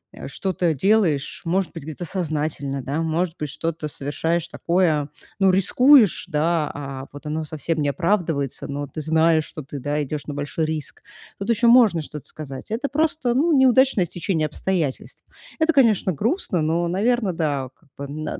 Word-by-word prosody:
э, - - -8
что-то 180 -3 -1
делаешь, 165 -4 +1
может 185 0 0
быть, - - -7
где-то 155 +3 -6
сознательно, 150 -6 -3
да. 145 +4 -2
Может 165 +1 -1
быть, 150 -2 -3
что-то 155 +1 -4
совершаешь 155 +4 -2
такое, 165 -5 +1 0.3
ну, 195 -1 +5
рискуешь, 225 - +5
да, 160 -1 0
а 135 -2 -6
вот 145 +2 -11
оно 155 +1 -3
совсем 155 +2 -3
не 145 - +1
оправдывается, 165 -5 -1
но 145 +1 -4
ты 155 +4 -6
знаешь, 160 0 +3
что 155 - -9
ты, 140 +1 -7
да, 145 +3 -1
идешь 145 +1 -5
на 145 - -4
большой 145 +2 -2
риск. 155 -1 -5 0.4
Тут 195 +3 -5
еще 235 +1 +2
можно 230 -8 +6
что-то 150 -1 -9
сказать. 140 +3 -9
Это 250 +5 -2
просто, 295 -4 0
ну, 315 +6 +2
неудачное 260 -6 +4
стечение 165 -2 -2
обстоятельств. 155 -3 -3 0.3
Это, 320 0 +3
конечно, 220 -8 +3
грустно, 215 - -1
но, 165 +2 0
наверно, 205 +2 +1
да, 145 -6 -1
как 160 - -30
бы, 140 - -5
н 150 +2 -6
на - - -4
160 Hz, 175 wpm, -22 LUFS, 150-195 Hz, 0.4 s, можно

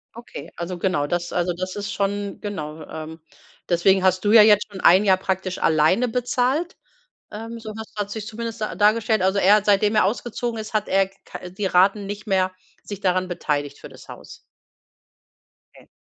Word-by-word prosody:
Okay, 230 -10 -10
also, 175 +1 -5
genau, 175 -5 0
das 175 +1 -3
also, 175 0 0
das 185 +2 -5
ist 205 0 -4
schon, 200 0 -3
genau 160 -6 -6
ähm, 160 +1 -8 0.5
deswegen 185 +2 +3
hast 185 -1 +2
du 205 - +2
ja 220 -1 +9
jetzt 210 -1 +4
schon 195 -2 -9
ein 185 +4 +6
Jahr 190 -2 +4
praktisch 190 -1 -3
alleine 160 +10 +2
bezahlt. 255 +7 -1 0.5
Ähm, 225 +2 -7
so 220 -1 -8
hast 220 -1 -9
hat's 205 -1 -4
sich 220 -2 -6
zumindest 230 0 -6
da 215 - -2
dargestellt. 215 +2 +2
Also, 190 +2 +1
er 200 +2 +6
hat, 210 -1 0
seitdem 205 +1 +3
er 210 - +4
ausgezogen 235 +2 -3
ist, 215 0 -8
hat 215 -1 0
er 195 0 +2
k-ka 195 - -12
äh, 180 - -8
die 195 +2 -4
Raten 195 +3 +3
nicht 205 +1 -7
mehr 190 -3 +1 0.3
sich 205 -1 -8
daran 185 -1 +1
beteiligt 145 -5 -3
für - - -11
das - - -15
Haus? - - -11 1.4
Ne. - - -21
200 Hz, 190 wpm, -22 LUFS, 185-215 Hz, 1.4 s, ja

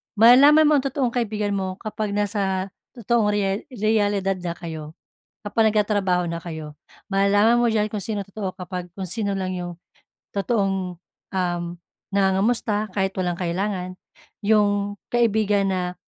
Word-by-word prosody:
Malalaman 265 +8 +8
mo 300 -2 +5
ang - - -4
totoong 260 -2 -1
kaibigan 215 -4 -1
mo 190 -2 -2
kapag 215 -1 -3
nasa 195 -2 -1 0.2
totoong 235 -1 +1
rea 205 -1 +1
realidad 205 -5 0
na 175 -1 -4
kayo. 160 -2 -7 0.5
Kapag 220 +2 +2
nagtatrabaho 195 -5 +1
na 170 - -3
kayo. 160 -3 -7 0.4
Malalaman 205 +4 +4
mo 240 - +3
diyan 215 -1 +1
kung 210 - -3
sinong 210 -3 -3
totoo, 190 -3 -4
kapag 180 -1 -6
kung 190 -2 -4
sino 200 -1 -1
lang 185 -1 -2
'yong 175 -1 -5 0.6
totoong, 195 -4 -1 0.4
um, 175 -2 0 0.5
nangangamusta 205 +2 +1
kahit 190 0 +1
walang 175 -1 -1
kailangan. 185 +1 -3 0.4
'Yong 205 -1 +2 0.2
kaibigan 210 -4 +2
na 180 -1 -2
200 Hz, 140 wpm, -23 LUFS, 185-215 Hz, 0.6 s, Malalaman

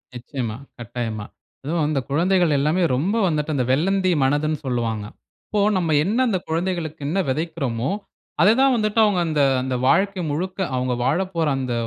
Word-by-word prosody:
நிச்சயமா, 120 -3 -5 0.2
கட்டாயமா. 115 -2 -4 0.4
அதுவும் 160 +2 -1
அந்த 150 -3 0
குழந்தைகள் 175 +1 +2
எல்லாமே 155 +6 +1
ரொம்ப 185 - 0
வந்துட்டு, 155 -1 -1
அந்த 125 -3 +1
வெள்ளந்தி 185 +6 +2
மனதுன்னு 145 +2 +1
சொல்லுவாங்க. 115 -4 -2 0.4
அப்போ 210 -1 0 0.2
நம்ம 165 -4 0
என்ன 210 +7 0
அந்த 195 - +1
குழந்தைகளுக்கு 165 -2 -2
என்ன 175 +7 0
வெதைக்குறோமோ, 135 -5 -2 0.5
அத 195 - +6
தான் 270 -1 +5
வந்துட்டு 215 -1 0
அவங்க 200 -4 +1
அந்த 155 -2 +1 0.2
அந்த 130 0 -2
வாழ்க்கை 195 +3 +2
முழுக்க 185 +6 -3 0.2
அவங்க 125 0 0
வாழப்போற 165 +3 0
அந்த 125 -2 -2
155 Hz, 150 wpm, -22 LUFS, 130-185 Hz, 0.5 s, அத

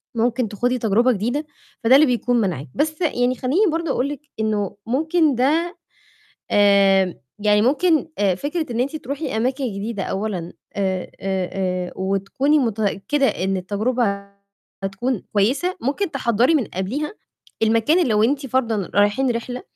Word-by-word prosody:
ممكن 235 +1 +1
تخوضي 245 +5 0
تجربة 235 +2 +3
جديدة، 245 +8 -1 0.4
فده 235 +3 +6
اللي 295 +3 +7
بيكون 245 -1 +1
مانعِك. 170 -9 -2
بس 310 +2 -1
يعني 250 -6 +1
خلّيني 320 +11 +1
برضه 330 -1 -1
أقول 265 +1 0
لِك 290 -1 -6 0.2
إنه 210 -3 -1
ممكن 310 +4 +2
ده 315 +8 +1 0.8
آمم، 195 -2 +4 0.2
يعني 210 0 +3
ممكن 310 +6 +2
آآ، 195 -3 +2
فكرة 300 - -3
إن 235 - -1
أنتِ 280 +5 -1
تروحي 280 -2 -4
أماكن 260 +4 0
جديدة 205 -1 -4
أولًا 190 -3 -3 0.2
آآ 190 -2 -1 0.2
آآ 190 -2 -2
آآ، 185 -2 -2
وتكوني 195 +10 +1
متأكدة 225 +3 0
إن 190 +1 -1
التجربة 200 +1 -1 0.6
هتكون 205 +4 -2
كويسة، 265 - +1
ممكن 295 +9 -1
تحضّري 250 +1 +2
من 275 - +2
قَبليها 245 - -3 0.5
المكان 230 +10 +3
لو 215 -1 +3
أنتِ 275 +4 +1
فَرضًا 230 -6 -1
رايحين 205 +6 +3
رحلة، 245 +1 -4
235 Hz, 145 wpm, -21 LUFS, 200-280 Hz, 0.8 s, اللي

